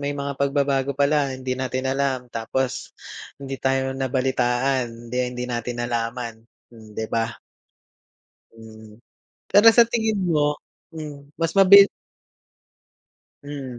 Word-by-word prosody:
may 145 Hz, 0 st, -3 dB
mga 140 Hz, 0 st, -3 dB
pagbabago 140 Hz, -1 st, 0 dB
pala 140 Hz, -2 st, +1 dB
hindi 130 Hz, 0 st, -4 dB
natin 130 Hz, 0 st, -3 dB
alam 135 Hz, -2 st, -1 dB
tapos, 125 Hz, +3 st, -3 dB, 0.4 s
hindi 135 Hz, -1 st, -5 dB
tayo 135 Hz, 0 st, 0 dB
nabalitaan 130 Hz, -1 st, 0 dB, 0.2 s
hindi 125 Hz, +1 st, -3 dB
hindi 125 Hz, 0 st, -5 dB
natin 120 Hz, 0 st, -4 dB
nalaman 115 Hz, 0 st, -3 dB, 0.4 s
hmm, 110 Hz, -2 st, -15 dB
'di 110 Hz, -, -2 dB
ba? 115 Hz, -1 st, -1 dB, 1.2 s
Mm. 110 Hz, -1 st, -14 dB, 0.5 s
Pero 205 Hz, +3 st, +5 dB
sa 235 Hz, -, +8 dB
tingin 220 Hz, -3 st, 0 dB
mo 150 Hz, -2 st, +2 dB, 0.4 s
hmm, 145 Hz, -2 st, -9 dB
mas 165 Hz, 0 st, -1 dB
mabil 200 Hz, +1 st, +8 dB, 1.5 s
Hmm, 135 Hz, -4 st, -7 dB
130 Hz, 120 wpm, -23 LUFS, 125-145 Hz, 1.5 s, sa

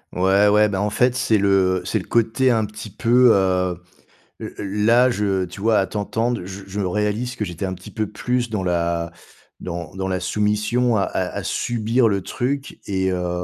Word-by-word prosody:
Ouais, 95 Hz, +3 st, +4 dB
ouais. 105 Hz, +1 st, +4 dB
Ben, 95 Hz, -2 st, -2 dB
en 105 Hz, +1 st, 0 dB
fait, 125 Hz, +4 st, +2 dB
c'est 110 Hz, -3 st, +2 dB
le 95 Hz, -2 st, +2 dB
c'est -, -, -1 dB
le -, -, -9 dB
côté 115 Hz, +3 st, +2 dB
un 115 Hz, -2 st, +2 dB
petit 105 Hz, +1 st, -9 dB
peu, 120 Hz, +3 st, +4 dB
hem, 90 Hz, -2 st, +1 dB, 0.6 s
le -, -, -7 dB, 0.3 s
là, 120 Hz, +3 st, +5 dB
je, 100 Hz, -4 st, 0 dB
tu 90 Hz, +3 st, -10 dB
vois, 110 Hz, 0 st, +3 dB
à 95 Hz, -, +2 dB
t'entendre 115 Hz, +2 st, -2 dB
je 95 Hz, +2 st, -8 dB
je 100 Hz, +1 st, -6 dB
réalise 105 Hz, +6 st, -1 dB
que 105 Hz, -, -3 dB
j'étais 90 Hz, +1 st, -5 dB
un 95 Hz, 0 st, -3 dB
petit 90 Hz, -, -12 dB
peu 110 Hz, -1 st, -2 dB
plus 125 Hz, -1 st, -2 dB
dans 105 Hz, -4 st, -2 dB
la 85 Hz, -1 st, -1 dB, 0.5 s
dans 85 Hz, -2 st, -6 dB
dans 95 Hz, 0 st, -3 dB
la 95 Hz, -1 st, -1 dB
soumission 105 Hz, +5 st, +1 dB
à 100 Hz, -, +2 dB
à -, -, -2 dB
à -, -, -4 dB
subir 115 Hz, +1 st, +1 dB
le 100 Hz, -3 st, 0 dB
truc 135 Hz, +2 st, -3 dB
et 95 Hz, -1 st, 0 dB
heu, 90 Hz, -1 st, -2 dB
105 Hz, 195 wpm, -21 LUFS, 95-115 Hz, 0.6 s, là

